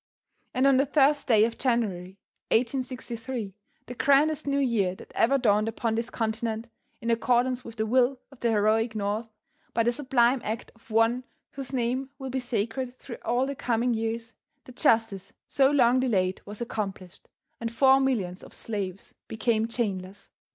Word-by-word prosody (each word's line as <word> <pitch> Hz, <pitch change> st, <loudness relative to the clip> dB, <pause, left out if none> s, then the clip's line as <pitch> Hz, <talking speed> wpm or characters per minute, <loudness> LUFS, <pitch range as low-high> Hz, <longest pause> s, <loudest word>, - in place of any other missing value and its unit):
And 255 Hz, +2 st, +3 dB
on 275 Hz, -1 st, +5 dB
the 275 Hz, +2 st, +2 dB
1st 285 Hz, +1 st, +3 dB
day 220 Hz, -4 st, +5 dB
of 230 Hz, -, -4 dB
January, 200 Hz, -7 st, -1 dB, 0.3 s
1863, 245 Hz, -2 st, -2 dB, 0.3 s
the 245 Hz, -, -7 dB
grandest 285 Hz, +4 st, +3 dB
New 280 Hz, 0 st, +1 dB
Year 225 Hz, -9 st, +1 dB
that -, -, -14 dB
ever 270 Hz, +4 st, +3 dB
dawned 215 Hz, -4 st, +2 dB
upon 225 Hz, 0 st, -1 dB
this 230 Hz, +1 st, -2 dB
continent, 225 Hz, 0 st, -2 dB, 0.3 s
in 230 Hz, -, 0 dB
accordance 245 Hz, +2 st, +1 dB
with 230 Hz, -, -10 dB
the 220 Hz, -1 st, -1 dB
will 250 Hz, +3 st, +2 dB
of 275 Hz, -, -16 dB
the 235 Hz, -, +1 dB
heroic 220 Hz, +1 st, +2 dB
North, 210 Hz, +2 st, -2 dB, 0.5 s
by 230 Hz, -, +3 dB
the 240 Hz, -, +2 dB
sublime 255 Hz, -1 st, +2 dB
act 220 Hz, +1 st, -4 dB
of 225 Hz, +1 st, -26 dB
one 225 Hz, +3 st, +2 dB, 0.3 s
whose 270 Hz, -2 st, -7 dB
name 255 Hz, +1 st, -1 dB
will 265 Hz, -2 st, -6 dB
be 260 Hz, -, -1 dB
sacred 245 Hz, +1 st, -3 dB
through 245 Hz, -, -9 dB
all 245 Hz, +3 st, +1 dB
the 280 Hz, -, -3 dB
coming 245 Hz, -2 st, 0 dB
years, 225 Hz, 0 st, -3 dB, 0.3 s
the -, -, -12 dB
justice 225 Hz, -5 st, +1 dB
so 270 Hz, -1 st, +3 dB
long 255 Hz, -3 st, +4 dB
delayed 190 Hz, -8 st, 0 dB
was 210 Hz, +2 st, -8 dB
accomplished, 195 Hz, -6 st, -5 dB, 0.3 s
and 230 Hz, -1 st, -3 dB
four 265 Hz, +3 st, +5 dB
millions 205 Hz, -10 st, -1 dB
of -, -, -11 dB
slaves 200 Hz, -4 st, -5 dB
became 220 Hz, 0 st, 0 dB
chainless. 200 Hz, -4 st, -4 dB
235 Hz, 165 wpm, -27 LUFS, 220-255 Hz, 0.5 s, on